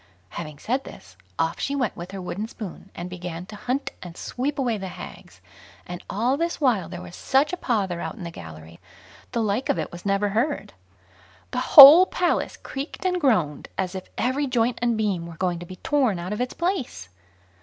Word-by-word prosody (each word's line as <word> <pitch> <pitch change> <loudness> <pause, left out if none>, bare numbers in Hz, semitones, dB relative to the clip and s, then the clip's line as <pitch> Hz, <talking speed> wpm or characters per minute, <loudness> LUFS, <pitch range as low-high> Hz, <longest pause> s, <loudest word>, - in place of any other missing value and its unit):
Having 155 - -7
said 255 - -2
this, - - -13 0.2
off - - 0
she 280 - -1
went 255 -6 -1
with 175 +1 -8
her 195 0 -7
wooden 190 +4 -4
spoon, 200 -4 -9
and 175 - -5
began 175 -1 -6
to 215 - -10
hunt 255 +6 -2
and 175 -1 -9
sweep 275 +4 -3
away 250 -5 0
the 190 - -5
hags; 180 - -11 0.4
and 175 0 -7
all 240 +7 +1
this 335 +2 -2
while 225 - +2
there 180 0 -7
was 180 -1 -10
such 275 +5 +1
a - - +2
pother 200 - -1
out - - -4
in 205 - -9
the 170 - -5
gallery, 80 - -11 0.5
the 235 - 0
like 215 +5 -1
of - - +2
it 160 - -3
was 175 0 -10
never 200 +1 +1
heard. 240 +9 -1 0.8
The 250 - -1 0.2
whole 300 +7 +13
Palace 355 - 0
creaked 280 +7 -7
and 360 -1 +1
groaned 180 - +1
as 185 -1 -1
if 185 -1 -7
every 275 +3 0
joint 245 -1 +1
and 235 -2 +1
beam 195 -6 -1
were 165 -1 -10
going 180 -2 -1
to 175 - -9
be 185 - -8
torn 255 -2 +1
out 175 +4 -4
of 210 - -3
its 250 - -3
place. 275 - -2
210 Hz, 205 wpm, -24 LUFS, 175-265 Hz, 0.8 s, whole